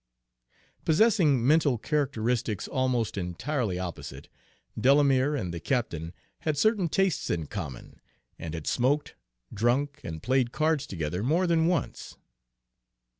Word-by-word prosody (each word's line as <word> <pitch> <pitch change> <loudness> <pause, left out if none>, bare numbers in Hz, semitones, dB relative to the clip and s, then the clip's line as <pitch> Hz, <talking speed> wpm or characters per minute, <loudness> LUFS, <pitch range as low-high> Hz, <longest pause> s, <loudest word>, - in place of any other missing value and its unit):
Possessing 160 - +3
mental 145 -3 +4
characteristics 120 -5 -1
almost 125 -5 0
entirely 105 - -2
opposite, 90 -2 -7 0.5
Delamere 135 +3 +3
and 90 -11 -3
the 85 - -4
captain 85 - -2 0.3
had 155 -2 -1
certain 200 0 +2
tastes 195 -3 0
in 80 -3 -1
common, 75 - -7 0.4
and 80 0 -5
had 80 - -6
smoked, 140 +4 +1 0.4
drunk, 130 +6 0
and 80 -1 -6
played 130 0 +1
cards 155 -1 0
together 80 0 -3
more 160 - +2
than 165 -2 +2
once. 175 -6 -2
130 Hz, 120 wpm, -28 LUFS, 100-150 Hz, 0.5 s, mental